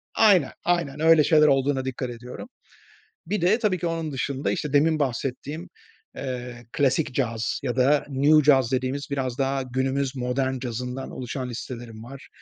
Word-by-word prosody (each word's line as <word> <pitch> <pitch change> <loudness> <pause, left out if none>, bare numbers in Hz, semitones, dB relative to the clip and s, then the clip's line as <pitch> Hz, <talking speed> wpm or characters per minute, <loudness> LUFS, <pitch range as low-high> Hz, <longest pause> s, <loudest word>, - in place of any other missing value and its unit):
aynen, 195 -9 +5
aynen, 170 -5 0
öyle 160 -1 +6
şeyler 155 -1 +5
olduğuna 135 -1 +2
dikkat 130 -1 -3
ediyorum. 120 +1 -8 0.8
Bir 205 +1 -1
de, 190 +7 +3
tabii 205 -6 +1
ki, 170 - -3
onun 165 -2 -2
dışında, 135 +1 -2
işte, 150 - -3
demin 155 +2 +3
bahsettiğim, 140 +4 -3 0.5
eee, 125 -2 -6
klasik 140 -2 +1
caz 115 -4 -1
ya 125 -2 -2
da 140 +3 +3
new 145 +3 +4
caz 135 -4 +4
dediğimiz 130 +2 -1
biraz 130 -2 -2
daha 135 0 0
günümüz 130 +2 -1
modern 130 +1 -1
cazından 125 +2 -5
oluşan 125 0 -5
listelerim 115 -2 -7
var. 135 +3 -11
135 Hz, 155 wpm, -25 LUFS, 125-150 Hz, 0.8 s, öyle